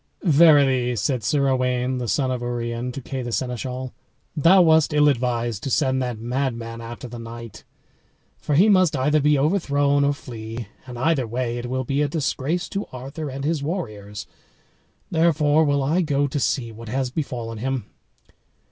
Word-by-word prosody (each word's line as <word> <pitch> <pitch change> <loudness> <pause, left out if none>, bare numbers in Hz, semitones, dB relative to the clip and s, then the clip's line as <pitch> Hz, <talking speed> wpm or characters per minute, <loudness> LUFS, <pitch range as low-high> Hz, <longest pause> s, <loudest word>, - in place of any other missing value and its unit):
"Verily," 140 -7 +5
said 125 +1 -1
Sir 140 +4 +1
Owain, 125 -1 0
the 120 - -3
son 130 +2 +1
of 125 -1 -2
Urien, 120 0 -3
to 135 - -7
Kay 135 0 -4
the 120 -1 -5
Seneschal, 125 +1 -3 0.4
"thou 170 +5 +6
wast 160 -2 +4
ill 150 0 +5
advised 120 -5 0
to 140 - -4
send 130 -1 +1
that 125 -3 -3
madman 115 -1 -3
after 120 +2 -8
the 120 0 -8
knight, 115 -1 -9 0.8
for 150 - -1
he 185 +8 +6
must 185 -6 +4
either 145 +3 +2
be 150 0 +3
overthrown 145 -3 +2
or 140 0 +2
flee, 115 -4 -7 0.2
and 125 -1 -8
either 130 -1 +1
way 120 +1 -2
it 120 - -5
will 130 +1 -2
be 140 +3 -1
a 150 - +2
disgrace 150 +2 -2
to 200 +1 -4
Arthur 135 +4 -6
and 135 +1 -5
his 155 -1 0
warriors; 105 - -5 0.9
therefore 160 -2 +3
will 145 -2 +1
I 160 +7 +2
go 145 -4 +1
to 140 +1 -2
see 120 -3 -1
what 115 +1 -10
has 130 +1 -1
befallen 120 -6 -4
him." 130 -2 -2
130 Hz, 175 wpm, -23 LUFS, 120-145 Hz, 0.9 s, thou